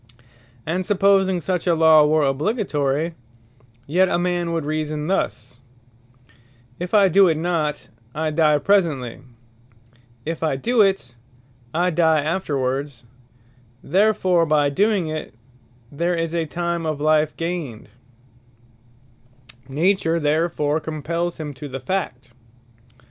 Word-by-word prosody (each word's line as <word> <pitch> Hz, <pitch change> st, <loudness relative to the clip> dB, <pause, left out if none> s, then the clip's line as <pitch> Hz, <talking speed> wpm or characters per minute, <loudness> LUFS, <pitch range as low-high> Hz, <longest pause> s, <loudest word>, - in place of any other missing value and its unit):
And 180 Hz, +4 st, -1 dB
supposing 195 Hz, -1 st, +2 dB
such 180 Hz, +2 st, -2 dB
a 170 Hz, -, +3 dB
Law 160 Hz, -2 st, +6 dB
were 155 Hz, 0 st, +2 dB
obligatory; 150 Hz, -, -1 dB, 0.7 s
yet 180 Hz, +6 st, +2 dB
a -, -, +1 dB
man 175 Hz, -1 st, -1 dB
would 165 Hz, -3 st, -2 dB
reason 155 Hz, 0 st, -3 dB
thus, 150 Hz, -8 st, -3 dB, 1.2 s
"If 180 Hz, +4 st, -2 dB
I 200 Hz, -2 st, +6 dB
doe 190 Hz, +2 st, +5 dB
it 160 Hz, -2 st, +1 dB
not, 160 Hz, -3 st, -2 dB, 0.3 s
I 155 Hz, 0 st, -1 dB
die 150 Hz, -1 st, +3 dB
presently; 145 Hz, -, 0 dB, 1.1 s
if 165 Hz, 0 st, -4 dB
I 155 Hz, -4 st, 0 dB
doe 230 Hz, -, +1 dB
it, 195 Hz, -11 st, +1 dB, 0.6 s
I 175 Hz, +5 st, +1 dB
die 160 Hz, -1 st, +3 dB
afterwards; 140 Hz, -5 st, -2 dB, 0.8 s
therefore 185 Hz, -1 st, +2 dB
by 145 Hz, -2 st, +2 dB
doing 200 Hz, +2 st, +1 dB
it, 155 Hz, -5 st, -6 dB, 0.6 s
there 170 Hz, +5 st, -1 dB
is 165 Hz, 0 st, -2 dB
time 170 Hz, -1 st, -2 dB
of 155 Hz, -2 st, -2 dB
life 155 Hz, 0 st, +2 dB
gained;" 165 Hz, -9 st, -4 dB, 1.8 s
Nature 170 Hz, +3 st, +1 dB
therefore 150 Hz, 0 st, 0 dB
compells 165 Hz, +3 st, -3 dB
him 150 Hz, -2 st, -5 dB
to 140 Hz, +2 st, -8 dB
the 135 Hz, -1 st, -6 dB
fact. 130 Hz, -5 st, -4 dB
160 Hz, 115 wpm, -21 LUFS, 150-180 Hz, 1.8 s, Law